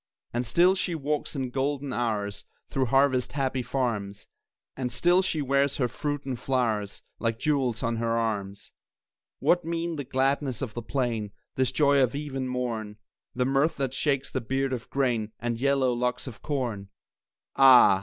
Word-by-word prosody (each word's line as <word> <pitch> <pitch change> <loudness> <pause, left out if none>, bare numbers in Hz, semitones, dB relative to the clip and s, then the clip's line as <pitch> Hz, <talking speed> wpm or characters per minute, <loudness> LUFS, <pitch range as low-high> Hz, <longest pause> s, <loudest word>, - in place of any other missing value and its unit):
And 120 0 -1
still 175 +10 +5
she 185 -2 -1
walks 150 0 -2
in 130 -3 -2
golden 140 +1 -1
hours 105 -4 -2 0.3
Through 135 - 0
harvest 135 0 +2
happy 135 -2 0
farms, 110 -6 -2 0.5
And 125 -2 -3
still 175 +9 +4
she 160 -5 -1
wears 140 +1 +2
her 125 - +1
fruits 145 +3 -3
and 130 -3 -3
flowers 115 -6 -1 0.2
Like 115 -1 0
jewels 130 -4 0
on 115 -1 0
her 115 0 0
arms. 100 -4 -3 0.7
What 175 0 +2
mean 165 0 -2
the 145 - -3
gladness 135 0 0
of 115 -5 -4
the 120 - -4
plain, 115 -4 -2 0.2
This 130 -1 +1
joy 140 0 +4
of 130 +1 +2
eve 145 -1 -5
and 130 -1 -2
morn, 115 -4 -3 0.4
The 125 0 +1
mirth 140 +4 +2
that 135 -2 -1
shakes 140 -1 0
the 130 - -2
beard 135 +3 -1
of 120 -3 -5
grain 120 -6 0
And 120 0 -3
yellow 135 -2 +3
locks 125 +1 -1
of 130 -3 -9
corn? 120 -9 -3 0.7
Ah! 125 -8 +8
130 Hz, 170 wpm, -27 LUFS, 115-140 Hz, 0.7 s, Ah